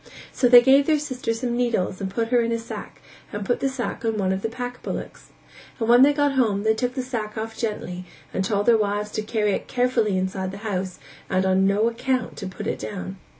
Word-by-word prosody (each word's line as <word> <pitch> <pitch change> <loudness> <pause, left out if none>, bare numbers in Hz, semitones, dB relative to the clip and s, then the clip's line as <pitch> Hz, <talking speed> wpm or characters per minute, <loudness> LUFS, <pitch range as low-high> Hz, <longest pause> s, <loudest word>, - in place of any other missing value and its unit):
So 245 - +3
they 245 0 +9
gave 275 +2 +5
their 310 -1 +4
sister 260 -5 -3
some 240 +1 -2
needles 235 -7 0
and 195 - -2
put 225 +4 -2
her 245 -1 +4
in 230 0 -1
a 230 - +1
sack 230 - -8 0.3
and 205 -1 -4
put 245 - 0
the 275 - +1
sack 255 -2 -4
on 225 -1 0
one 190 -2 +1
of 190 - -3
the 225 - -2
pack 245 +1 -6
bullocks. - - -6 0.5
And 225 - -1
when 240 +1 +7
they 280 +2 +7
got 290 -1 +2
home, 220 -7 +1
they 220 0 +3
took 250 +3 -2
the 260 - -2
sack 220 -5 -4
off 225 +1 -4
gently 185 -5 -4 0.3
and 190 - 0
told 205 +1 0
their 230 -2 +5
wives 210 0 -1
to - - -2
carry 215 -1 0
it - - -3
carefully 245 -5 +1
inside 190 0 -2
the 195 - -7
house, 185 -3 -2 0.3
and 185 0 +1
on 190 0 +3
no 205 +3 +2
account 250 +2 -1
to 195 - -5
put 185 - -7
it - - -2
down. 95 -3 -6
225 Hz, 235 wpm, -24 LUFS, 195-245 Hz, 0.5 s, they